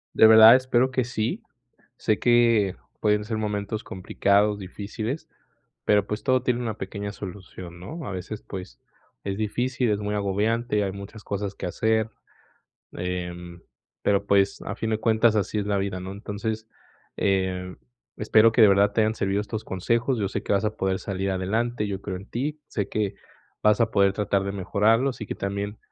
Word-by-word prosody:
De 110 - +8
verdad, 110 +1 +10
espero 130 0 +1
que 130 -2 0
sí, 110 -2 -2 0.6
sé 110 - 0
que 115 -5 +4 0.2
pueden 105 -1 +2
ser 110 0 -3
momentos 105 0 -2
complicados, 100 +2 +1
difíciles, 105 - -5 0.6
pero, 105 -1 +3
pues, 105 +1 -4
todo 130 -1 +2
tiene 125 -1 0
una 110 -3 -3
pequeña 100 +2 -5
solución, 90 -3 -9
¿no?, 155 - -7
a 105 - -4
veces, 95 +3 -6
pues, 95 -1 -8 0.4
es 100 -1 -2
difícil, 120 +3 -1
es 105 - +1
muy 105 0 -2
agobiante, 105 +2 0
hay 95 - -2
muchas 100 +2 -10
cosas 100 0 -3
que - - -5
hacer, 110 +4 +1 0.9
em, 90 -1 -5 0.4
pero, 100 0 +1
pues, 100 -1 +2
a - - -4
fin 115 - -3
de 110 - +1
cuentas, 110 0 +3
así 105 +1 -1
es 100 - -2
la 100 -1 0
vida, 95 -1 -2
¿no?, 95 +1 -6
entonces, 110 +2 -4 0.5
em, 95 -1 -1 0.4
espero 110 +1 +5
que 115 - +3
de 110 - +9
verdad 100 +1 +4
te 110 - -1
hayan 110 0 +1
servido 100 -1 0
estos 110 +1 -5
consejos, 115 +6 0
yo 100 - 0
sé - - -4
que - - -3
vas 100 +2 +1
a 105 0 -1
poder 95 -2 -1
salir 95 0 -2
adelante, 105 +4 -1
yo 100 -1 -4
creo 95 -2 -4
en 95 - -11
ti, 150 +5 -3
sé 100 -3 -3
que 105 -2 -1 0.5
vas 105 +1 +4
a 115 -1 +2
poder 100 -1 +4
tratar 100 -1 0
de 100 - -2
mejorarlo, 110 +6 +2
y 110 - -6
que - - -5
también, 100 +1 -3
105 Hz, 185 wpm, -25 LUFS, 100-110 Hz, 0.9 s, verdad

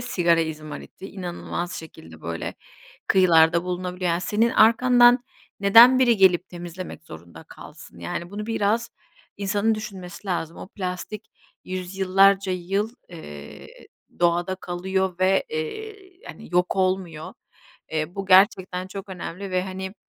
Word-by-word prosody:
sigara 175 -8 +2
izmariti, 155 +4 -7
inanılmaz 175 -1 -5
şekilde, 80 - -11
böyle, 85 0 -5 0.5
kıyılarda 170 -2 +4
bulunabiliyor. 180 0 -3
Yani, 170 +1 0
senin 220 +5 +1
arkandan 245 +2 +5 0.4
neden 230 +6 +8
biri 240 -3 +4
gelip 185 -2 +4
temizlemek 175 -1 -8
zorunda 85 - -12
kalsın? - - -13
Yani, 170 - -5
bunu 210 +1 -6
biraz 225 +1 0 0.5
insanın 205 +2 0
düşünmesi 195 -3 -8
lazım. 170 -3 -3
O - - -9
plastik 190 +2 -6 0.3
yüzyıllarca 190 +1 +2
yıl, 195 +5 -2 0.2
ııı, 75 - -10 0.5
doğada 175 +2 +1
kalıyor 185 0 -3
ve, 190 +1 +3
eee, 415 - -5 0.3
hani, - - -11
yok 180 +2 +1
olmuyor. 185 -4 -2 0.6
Iıı, 155 +2 -2
bu 195 -1 -5
gerçekten 185 -1 +4
çok 195 +1 -8
önemli 190 +1 -7
ve, 185 0 0
hani, 190 +1 -6
185 Hz, 125 wpm, -24 LUFS, 175-200 Hz, 0.6 s, neden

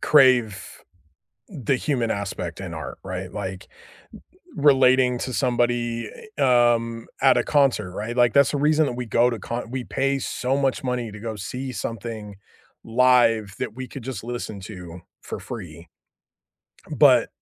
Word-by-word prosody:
Crave 130 -8 +3 0.7
the 140 - -1
human 125 -4 -1
aspect 95 -4 -4
in 90 -3 -6
art, 80 -3 -6
right? - - -5
Like, 95 +1 -6 0.9
r - - -4
relating 130 -2 +5
to 130 - -3
somebody, 120 -3 0 0.3
a 145 - +1
um, 120 -2 +2
at 135 - +5
a - - +2
concert, 135 -10 +2
right? 110 +5 -4
Like, 120 -2 +4
that's 140 0 +5
the 145 - -1
reason 155 +2 +3
that - - -2
we 125 - -3
go 120 +2 +3
to 115 -2 -4
con 120 +3 -5
we 130 -1 -4
pay 135 +1 0
so 130 +1 -1
much 135 -1 0
money 125 -3 -2
to 105 - -10
go 110 -1 -5
see 125 +7 -5
something 115 -3 -6 0.5
live 115 -4 +3
that 110 - -4
we 130 0 -6
could 130 +1 -9
just 120 -5 -6
listen 120 -4 -5
to 90 -3 -9 0.2
for - - -6
free. 85 +1 -9 1.1
But - - +6
120 Hz, 160 wpm, -23 LUFS, 110-130 Hz, 1.1 s, But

